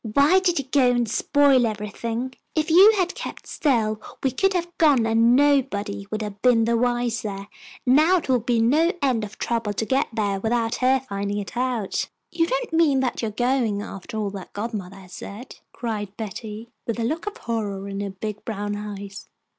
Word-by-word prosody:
"Why 300 +7 +6
did 360 -2 +1
you 275 - -1
go 260 -1 +3
and 240 -1 +1
spoil 270 +2 +3
everything? 225 +4 -4 0.2
If 310 0 0
you 390 +6 +8
had 360 -2 +1
kept - - -7
still 220 -7 0 0.2
we 265 - +2
could 390 +10 +1
have 345 -1 -2
gone 285 -8 +5
and 230 +2 +4
nobody 230 -8 +1
would 215 0 -3
have 205 -1 -7
been 235 -3 +4
the 235 +1 +2
wiser. 230 -4 -1 0.4
Now 310 +8 +5
it 335 - -4
will 255 -2 +3
be 235 0 0
no 305 +9 +3
end 250 -5 +2
of 210 0 -8
trouble 230 -3 -1
to 220 - -2
get 265 +4 +1
there 205 -3 -1
without 225 +2 0
her 260 +1 +3
finding 200 0 -3
it 205 +2 -5
out." 245 -5 -1 0.2
"You 330 -1 +1
don't - - -2
mean 305 -5 +4
that 255 -2 -1
you 225 - -1
are - - -4
going 240 -3 0
after 195 +2 -7
all 210 -2 -1
that 195 -2 -9
godmother 205 -3 -5
has 185 -2 -14
said?" 215 +8 -9
cried 210 -4 -5
Betty, 220 +1 -7 0.2
with 230 0 -2
a - - 0
look 315 - -2
of 415 - -4
horror 205 -4 -3
in 195 0 -5
her 200 0 -3
big 210 +2 -6
brown 205 -2 -3
eyes. 200 -1 -7
230 Hz, 195 wpm, -24 LUFS, 210-270 Hz, 0.4 s, you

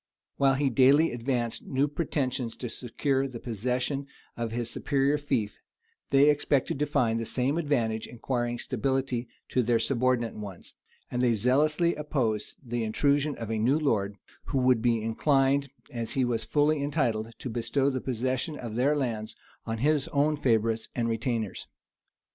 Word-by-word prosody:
While 135 -1 +4
he 135 0 +1
daily 135 +6 +5
advanced 120 -1 -2
new 135 +2 +1
pretensions 135 -6 -2
to 125 - -5
secure 135 +4 -1
the 125 -3 -8
possession 125 +5 -2 0.3
of 115 -1 -3
his 120 0 -2
superior 140 +4 +1
fief, 130 -8 -2 0.5
they 140 +1 +5
expected 145 -2 +2
to 150 - +1
find 120 -6 +1
the - - -2
same 130 +5 0
advantage 115 -8 0
in - - -11
acquiring 120 0 -2
stability 130 0 -1 0.2
to 130 - +2
their 120 0 +2
subordinate 125 -2 +1
ones; 100 -4 -9 0.4
and 125 - -1
they 120 -2 +3
zealously 150 - +2
opposed 130 -8 -2
the 120 -1 -2
intrusion 140 +6 +1
of 115 -1 -5
a 110 - -1
new 125 +7 +3
lord, 105 -10 0 0.3
who 140 - -2
would 125 -3 +3
be 115 -2 +2
inclined, 135 +4 +2 0.2
as 115 -2 -4
he 130 -2 +2
was 120 -2 -1
fully 150 0 +2
entitled, 115 -7 -1
to 130 - -6
bestow 135 +4 +1
the 130 -1 -3
possession 130 +4 -2
of 115 -3 -6
their 135 +6 +2
lands 115 -6 -2 0.3
on 115 0 -2
his 145 +3 +2
own 150 +2 +2
favorites 115 -4 +1
and 115 -1 0
retainers. 115 -2 -2
125 Hz, 160 wpm, -28 LUFS, 115-140 Hz, 0.5 s, daily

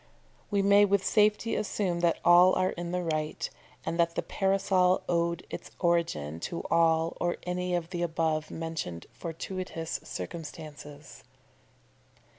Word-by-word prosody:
we 200 -1 +1
may 200 +1 +6
with 200 -1 +2
safety 210 +1 +3
assume 190 -4 -1
that 170 -1 +2
all 175 +2 +7
are 185 0 +2
in 175 0 -5
the 180 0 -1
right, 155 -2 -2 0.3
and 170 - -2
that 170 0 +2
the - - -1
Parasol 190 -2 +2
owed 170 0 0
its - - -6
origin 165 - 0
to 170 - -4
all 165 0 +3
or 175 0 0
any 180 0 -1
of 170 0 -3
the 175 -2 -3
above 160 -2 0
mentioned 160 - -5
fortuitous 165 -2 -5
circumstances. 150 -3 -8
170 Hz, 135 wpm, -29 LUFS, 160-185 Hz, 0.3 s, all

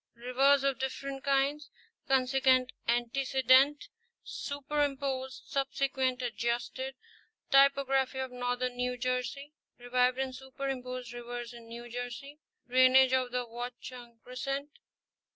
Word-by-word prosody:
—Rivers 265 +4 +3
of 275 -1 +1
different 270 +1 -4
kinds: 280 +1 +1 0.4
consequent, 260 -1 +3 0.2
antecedent, 260 +3 +3 0.4
superim 285 0 -2
posed, 265 -2 -3
subsequent, 265 -2 -1
adjusted.—Topography 265 - 0
of 260 -1 -3
Northern 245 0 -2
New 250 0 -1
Jersey. 255 +3 -3 0.2
—Revived 250 +1 +1
and 265 -1 -2
superimposed 255 -2 -5
rivers 240 0 -6
in 235 -1 -12
New 235 +1 -8
Jersey.—Drainage 255 +1 +2
of 255 -1 +1
the 250 0 -1
Watchung 240 0 -8
crescent. 275 +3 -4
260 Hz, 100 wpm, -31 LUFS, 245-275 Hz, 0.4 s, Rivers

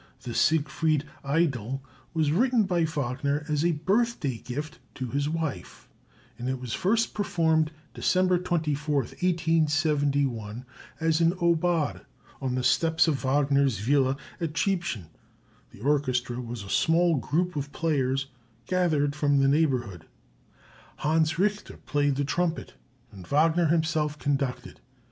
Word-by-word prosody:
The 120 - -5
"Siegfried 155 +1 +1 0.2
Idyl" 135 -4 0 0.3
was 155 -2 +2
written 240 - +3
by 175 -4 +1
Wagner 145 -1 -2
as 150 -1 0
a 170 0 +3
birthday 180 - 0
gift 150 +7 -6 0.2
to 130 - -4
his 145 +1 0
wife, 155 - -4 0.5
and 125 +2 -3
it 130 0 -2
was 125 -3 -5
first 225 +4 +1
performed 160 -6 +1 0.2
December 185 -1 +2
24, 155 -4 -1
1871, 145 -8 0 0.3
as 160 0 +1
an 165 +1 +4
aubade, 170 -3 +1 0.4
on 130 -2 -1
the 130 - -1
steps 160 +4 +3
of 145 -4 0
Wagner's 140 -2 +2
villa 135 +5 +2 0.2
at 165 -3 -3
Triebschen; 175 - -1 0.6
the - - -16
orchestra 130 -3 0
was 120 -3 -6
a 100 - -10
small 165 - +3
group 175 +6 -1
of 145 0 -4
players 135 -5 0 0.4
gathered 155 -4 +1
from 145 -2 +2
the 135 0 +4
neighborhood. 130 - 0 0.9
Hans 160 +1 +1
Richter 205 +3 -1
played 145 -2 +1
the 140 +1 -1
trumpet, 170 +3 -1 0.4
and 95 -4 -12
Wagner 160 +3 +3
himself 155 -2 0
conducted. 140 -3 -2
150 Hz, 130 wpm, -27 LUFS, 135-165 Hz, 0.9 s, an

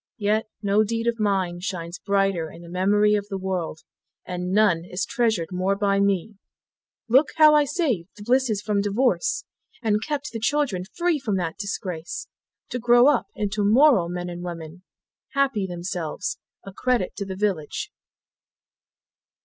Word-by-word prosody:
Yet 215 +1 +1 0.2
no 205 +1 +3
deed 230 +2 -2
of 235 -1 0
mine 190 -4 0
Shines 175 -2 -5
brighter 195 -5 0
in 170 - -12
the 170 - -11
memory 205 +4 +3
of 205 -1 0
the 195 - -4
world, 185 -4 -3 0.4
And 180 0 -4
none 195 -5 +3
is 180 +3 -3
treasured 220 -9 0
more 185 +2 0
by 200 -1 +1
me: 200 +1 0 0.7
Look 265 +6 +5
how 310 -1 +7
I 300 -1 +5
saved 265 - -1
the 205 - -10
Blisses 240 -3 +1
from 205 -1 +1
divorce, 245 - +1 0.4
And 215 -1 +1
kept 295 -1 -3
the 225 - -4
children 225 -7 0
free 345 -3 +2
from 210 -7 -1
that 170 -3 -3
disgrace, 190 - -4 0.4
To 250 - -3
grow 240 +3 +6
up 280 -5 +1
into 205 0 -1
moral 220 - +5
men 175 0 -4
and 175 0 -6
women, 170 0 -7 0.5
Happy 270 -8 +1
themselves, 175 0 -4 0.3
a 195 - -9
credit 245 -2 0
to 200 - -3
the 190 - -4
village. 190 -7 -2
200 Hz, 155 wpm, -24 LUFS, 180-235 Hz, 0.7 s, how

